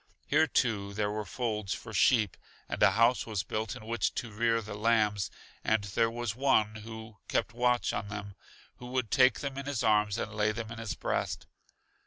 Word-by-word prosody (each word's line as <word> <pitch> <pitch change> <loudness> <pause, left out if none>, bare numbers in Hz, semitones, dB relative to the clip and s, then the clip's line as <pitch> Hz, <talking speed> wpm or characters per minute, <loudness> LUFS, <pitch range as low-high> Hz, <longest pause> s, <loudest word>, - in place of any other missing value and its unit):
Here, 160 +2 +3
too, 100 -8 0
there 105 0 0
were 105 0 -3
folds 105 -3 -2
for 110 - -9
sheep, 105 -1 +4 0.3
and - - -4
a - - +6
house 115 +2 +3
was 105 -4 -1
built 110 0 -3
in 110 - -10
which 115 +1 -1
to 115 - -4
rear 115 +2 +2
the 105 -2 -7
lambs, 105 -2 +2 0.3
and 110 -1 +2
there 115 +3 +1
was 120 -1 -3
One 115 -5 +2
who 110 0 -9
kept 110 - 0
watch 125 0 +2
on 105 0 -3
them, 100 -1 -6 0.4
who 125 - -9
would 125 -3 -2
take 130 0 +5
them 140 -1 -4
in 140 - -6
His 140 -5 -1
arms 105 -2 +3
and 110 - -3
lay 105 0 +1
them 110 0 -5
in 115 - -7
His 115 -2 -3
breast. - - -2
110 Hz, 200 wpm, -30 LUFS, 105-120 Hz, 0.4 s, a